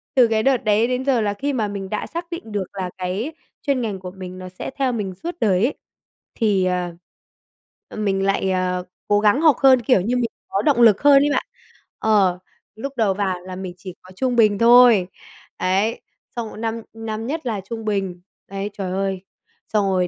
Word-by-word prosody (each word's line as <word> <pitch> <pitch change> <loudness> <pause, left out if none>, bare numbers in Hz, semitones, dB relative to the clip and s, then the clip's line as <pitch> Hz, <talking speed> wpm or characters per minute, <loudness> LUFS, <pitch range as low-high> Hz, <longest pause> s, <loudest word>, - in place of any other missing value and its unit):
từ 250 -3 +6
cái 220 -1 +1
đợt 270 -1 +4
đấy 215 +2 +3
đến 255 +1 -2
giờ 255 -5 +2
là 205 -1 0
khi 280 +6 -2
mà 220 -4 0
mình 200 -2 -5
đã 210 - -3
xác 340 +1 -6
định 280 -10 -7
được 205 -2 -1
là 185 -2 -4
cái 190 - -3 0.3
chuyên 275 -3 0
ngành 205 -4 -3
của 180 -1 -7
mình 185 -1 -9
nó 185 0 -8
sẽ 185 - -7
theo 270 -2 +1
mình 200 -4 -3
suốt 345 +1 -4
đời 190 -2 +3
ấy, 290 - 0 0.6
thì, 205 -5 +2
ờ, 180 -1 -1 1.0
mình 195 -2 0
lại, 195 -1 +1
ờ, 180 -1 0 0.2
cố 205 0 +3
gắng 210 +7 +3
học 310 -5 +5
hơn, 260 -2 +6
kiểu 235 -4 +3
như, 235 +7 -1
mình 240 -2 0 0.2
có 385 - 0
động 280 -6 +2
lực 215 -4 +6
hơn 280 -1 +6
ấy 290 - +2
bạn. - - 0 0.5
Ờ, 195 -5 +3 0.4
lúc 275 +5 -6
đầu 215 -4 +2
vào 190 -2 -2
là 185 0 -8
mình 185 -1 -6
chỉ 185 -2 -9
có 185 - -15
trung 255 +1 0
bình 215 -3 +4
thôi, 235 -5 +7 0.5
ấy, 195 +5 0 0.3
xong 230 -2 -3
1 - - -11
năm 225 +1 -3
năm 225 0 -5
nhất 310 +1 -4
là 215 -5 -2
trung 225 -1 -5
bình, 195 -4 -2 0.3
ấy, 195 +1 -4
trời 190 -3 -4
ơi. 190 0 -2 0.4
Xong 210 -2 +1
rồi 185 -2 +1
210 Hz, 210 wpm, -21 LUFS, 190-240 Hz, 1.0 s, thôi